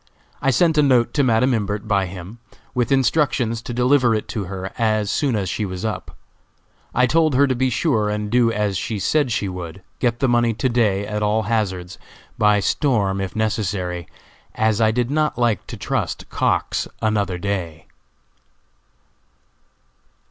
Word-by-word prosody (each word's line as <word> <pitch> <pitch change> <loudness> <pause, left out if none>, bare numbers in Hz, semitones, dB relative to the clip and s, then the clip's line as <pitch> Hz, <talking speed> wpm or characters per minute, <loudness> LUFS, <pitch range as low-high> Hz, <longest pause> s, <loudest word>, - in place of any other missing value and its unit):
I 135 - +2
sent 160 +4 +3
a - - +7
note 125 -4 +3
to 145 - +2
Madam 125 +1 +3
Imbert 105 -1 -2
by 100 -2 +1
him, 95 +5 -9 0.3
with 125 -1 0
instructions 130 -4 +1
to 120 - -7
deliver 125 -1 +3
it 110 - -3
to 105 -3 -3
her 95 +1 -6
as 110 -3 +1
soon 140 -6 0
as 100 -3 -1
she 105 - -2
was 95 +1 -4
up. 110 - -5 0.7
I 125 - +3
told 155 +1 +2
her 140 +2 +5
to 130 - +1
be 130 +1 +1
sure 115 -5 +1
and 105 0 -3
do 120 -1 +4
as 105 -3 -1
she 110 +2 -3
said 140 +6 +1
she 105 -2 -1
would 90 0 -7 0.2
get 120 -2 +1
the 135 - +2
money 120 -2 +2
to 130 - 0
day 105 -5 +1
at 105 0 -3
all 105 +1 +1
hazards 95 -4 -2 0.4
by 105 -1 +3
storm, 100 -8 +1
if 95 - -5
necessary, 95 -6 -2 0.5
as 110 0 +1
I 110 - +5
did 120 +3 0
not 155 0 0
like 120 -5 0
to - - -7
trust - - -3
Cox - - 0
another 105 -4 0
day. 90 -5 -4
110 Hz, 170 wpm, -21 LUFS, 100-125 Hz, 0.7 s, a